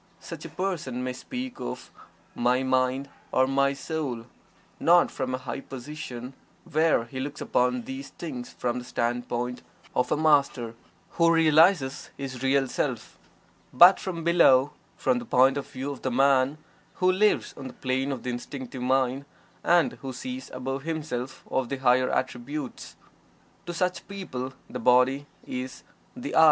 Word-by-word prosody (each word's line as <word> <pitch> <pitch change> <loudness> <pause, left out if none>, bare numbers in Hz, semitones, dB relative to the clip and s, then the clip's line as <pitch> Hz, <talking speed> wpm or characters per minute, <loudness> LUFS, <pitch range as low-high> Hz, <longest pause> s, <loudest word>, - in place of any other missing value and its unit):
Such - - -8
a - - -6
person 160 -10 -3
may 125 0 -2
speak 250 - -6
of - - -6 0.4
"my 125 +2 +2
mind," 130 +1 +1 0.2
or 130 - +4
"my 140 +1 +2
soul," 140 -6 -4 0.5
not 175 +1 +5
from 130 -1 -2
a - - -3
high 130 - -5
position 130 -2 -7 0.3
where 155 -5 +2
he 130 +3 -7
looks 145 +2 -4
upon 125 0 +1
these 135 +2 -7
things 130 -7 -7
from 125 0 -2
the - - -8
standpoint 120 0 -2 0.3
of 125 - +1
a - - +3
Master 140 -6 +3 0.4
who 170 0 +4
realizes 160 -2 +4
his 130 -3 -6
Real 135 0 +2
Self, - - -3 0.5
but 175 +9 +8
from 180 -5 -4
below, 150 -5 +5 0.2
from 250 - +1
the - - -7
point 135 - +4
of 140 - -4
view 135 +2 -5
of 140 - -8
the 130 - -1
man 135 +2 +3 0.4
who 185 0 +3
lives 205 +3 +2
on 135 - -7
the - - -9
plane 130 +2 -1
of 130 -3 -4
the 125 - -2
Instinctive 130 +1 -6
Mind 130 +1 +1 0.4
and 175 -1 +3
who 135 -1 -5
sees 255 - -6
above 135 +1 -4
himself 135 -5 -4 0.2
the 140 - -3
higher 130 -1 +3
attributes. 130 +2 -4 0.7
To 175 - -3
such 180 0 -1
people 135 -10 -5
the 125 - -6
body 125 +4 +4 0.2
is 130 +1 -5 0.3
the 250 +2 -6
"I." - - +6
135 Hz, 155 wpm, -27 LUFS, 125-155 Hz, 0.7 s, but